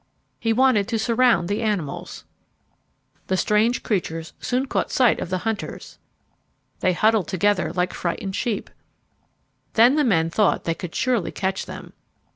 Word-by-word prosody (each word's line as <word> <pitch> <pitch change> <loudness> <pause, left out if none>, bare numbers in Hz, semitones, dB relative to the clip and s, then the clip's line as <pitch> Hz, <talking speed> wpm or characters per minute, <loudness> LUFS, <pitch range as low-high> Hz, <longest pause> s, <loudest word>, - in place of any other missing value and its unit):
He 225 - 0
wanted 230 -4 +3
to 230 - -1
surround 230 -4 +2
the 205 +4 -1
animals. 205 -10 -3 1.0
The 190 - 0
strange 215 +5 +2
creatures 165 -6 -2
soon 255 +2 -1
caught - - -1
sight 250 -3 +3
of - - -4
the 185 - 0
hunters. 220 -2 -5 0.8
They 185 - +2
huddled 215 -1 +2
together 190 -1 +1
like 180 +1 -1
frightened 190 +2 -3
sheep. 230 -5 -2 1.0
Then 240 +6 +5
the 300 - +3
men 165 - +2
thought 210 +3 +2
they 165 - 0
could 170 0 -8
surely 240 -7 0
catch 190 0 -2
them. - - -9
210 Hz, 145 wpm, -23 LUFS, 180-230 Hz, 1.0 s, Then